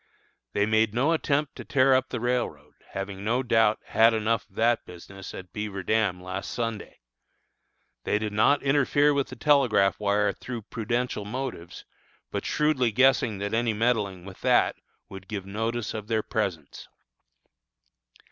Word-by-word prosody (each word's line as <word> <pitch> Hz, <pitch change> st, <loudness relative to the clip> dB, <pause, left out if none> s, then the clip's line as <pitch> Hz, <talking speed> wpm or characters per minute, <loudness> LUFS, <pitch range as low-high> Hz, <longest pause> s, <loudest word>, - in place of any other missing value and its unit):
They 100 Hz, -, +2 dB
made 110 Hz, 0 st, +2 dB
no 135 Hz, +7 st, +2 dB
attempt 150 Hz, -3 st, 0 dB
to -, -, -7 dB
tear 135 Hz, 0 st, +3 dB
up 130 Hz, 0 st, +2 dB
the 125 Hz, -, -3 dB
railroad, 110 Hz, -12 st, -2 dB, 0.2 s
having 95 Hz, 0 st, -5 dB
no 120 Hz, +5 st, +1 dB
doubt 115 Hz, -3 st, +3 dB
had 115 Hz, +1 st, +4 dB
enough 110 Hz, 0 st, -1 dB
of 95 Hz, -, -27 dB
that 115 Hz, +1 st, +2 dB
business 95 Hz, +2 st, -10 dB
at 90 Hz, -3 st, -10 dB
Beaver 105 Hz, -2 st, -4 dB
Dam 100 Hz, -4 st, 0 dB
last 95 Hz, +1 st, -5 dB
Sunday. 115 Hz, -3 st, -4 dB, 1.0 s
They -, -, +1 dB
did 105 Hz, -1 st, -3 dB
not 110 Hz, +7 st, +3 dB
interfere 145 Hz, +1 st, +3 dB
with 140 Hz, -1 st, 0 dB
the -, -, -9 dB
telegraph 130 Hz, -10 st, +3 dB
wire 105 Hz, 0 st, +1 dB
through 120 Hz, -3 st, -7 dB
prudential 120 Hz, +1 st, -2 dB
motives, 115 Hz, -6 st, -6 dB, 0.6 s
shrewdly 145 Hz, -6 st, +1 dB
guessing 125 Hz, -2 st, +3 dB
that 100 Hz, +2 st, -4 dB
any 115 Hz, 0 st, +1 dB
meddling 105 Hz, -5 st, 0 dB
with 95 Hz, -1 st, -11 dB
that -, -, +3 dB, 0.3 s
would 95 Hz, -1 st, -11 dB
give 100 Hz, -3 st, -5 dB
notice 110 Hz, +3 st, -3 dB
of 105 Hz, -1 st, -6 dB
their 110 Hz, -1 st, 0 dB
presence. 90 Hz, -9 st, -4 dB
110 Hz, 150 wpm, -26 LUFS, 100-125 Hz, 1.0 s, had